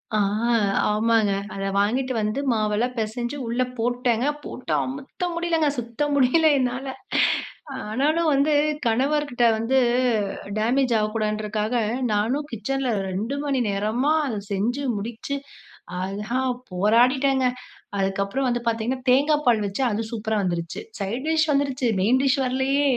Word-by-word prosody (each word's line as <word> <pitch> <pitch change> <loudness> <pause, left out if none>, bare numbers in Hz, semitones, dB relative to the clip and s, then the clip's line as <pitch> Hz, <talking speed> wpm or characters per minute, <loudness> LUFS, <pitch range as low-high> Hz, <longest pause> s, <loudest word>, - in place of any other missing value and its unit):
ஆ, - - +3 0.7
ஆமாங்க. 215 -1 +2 0.2
அத 195 - -5
வாங்கிட்டு 255 +6 +1
வந்து 215 +5 -1
மாவெல்லாம் 220 +2 0
பெசஞ்சு 240 +5 -3
உள்ள 235 +2 -1 0.2
போட்டேன் 245 0 0 0.2
போட்டு, 255 - -7
அமுத்த 270 +6 -6
முடியலங்க. 335 -3 +1
சுத்த 235 +2 -7
முடியல 285 +4 +4
என்னால, 250 +1 -1 1.0
ஆனாலும் 305 +8 +1
வந்து 280 +2 +3 0.4
கணவர்கிட்ட 265 +1 +1
வந்து 240 +4 +2 0.8
டேமேஜ் 245 +3 +2
ஆகக்கூடாதுன்றதுக்காக, 215 +1 -1 0.4
நானும் 245 +8 0
கிச்சன்ல 250 +2 -1 0.2
2 220 +9 -3
மணி 275 -3 +1
நேரமா 215 +9 +1
அத 225 -5 -3
செஞ்சு 235 +8 -1
முடிச்சு, 230 +6 -4 0.6
அதான் 210 +7 -2 0.2
போராடிட்டேங்க. 255 +8 +3 0.5
அதுக்கப்றம் 195 +7 0
வந்து 240 0 -1
பாத்தீங்கன்னா, 240 +3 -2
தேங்காய் 295 +3 +3
பால் 225 -3 +4
வச்சு 200 +7 -2
அது 215 +2 -1
சூப்பரா 220 -1 -1
வந்துருச்சு 175 +2 -3 0.2
சைட் 230 +8 -3
டிஷ் 315 -1 +2
வந்துருச்சு. 275 -3 +1
Main 245 +7 +3
dish 275 +1 +2
வரலயே. 270 +3 +1
245 Hz, 120 wpm, -24 LUFS, 215-270 Hz, 1.0 s, முடியல